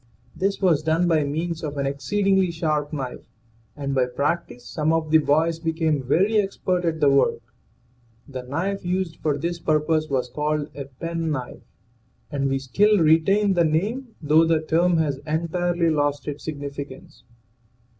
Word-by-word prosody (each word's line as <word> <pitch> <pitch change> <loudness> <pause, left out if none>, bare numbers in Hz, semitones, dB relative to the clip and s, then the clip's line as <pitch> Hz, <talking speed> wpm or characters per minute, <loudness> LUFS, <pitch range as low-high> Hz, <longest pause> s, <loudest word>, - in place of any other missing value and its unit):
This 195 +1 -1
was 175 -6 +3
done 160 +3 +1
by 160 -3 +3
means 160 +3 -3
of 145 -2 -4
an 140 - -1
exceedingly 190 +7 +1
sharp 155 -3 -1
knife, 135 -5 -6 0.5
and 140 -1 -3
by 130 -2 +2
practice 140 -1 -2
some 155 +3 -1
of 160 -1 0
the 160 - +7
boys 160 +2 +1
became 160 -3 0
very 185 - +2
expert 185 -3 -1
at 160 -1 -1
the 145 - +4
work. 135 -4 +2 0.8
The 130 -3 -6
knife 165 +10 -3
used 180 -2 -2
for 150 -2 -1
this 170 +3 -3
purpose 155 0 +1
was 130 -2 0
called 150 0 -2
a 140 -1 -6
pen 165 +5 -4
knife, 130 -5 -4 0.7
and 140 -2 0
we 135 - +1
still 205 +11 +3
retain 190 +5 +4
the 175 -2 +3
name 215 - -1
though 155 +2 +5
the 165 -1 +2
term 170 +2 +2
has 150 -4 0
entirely 170 +2 0
lost 145 -1 0
its 145 -1 -5
significance. 145 +3 -7
160 Hz, 160 wpm, -23 LUFS, 145-175 Hz, 0.8 s, the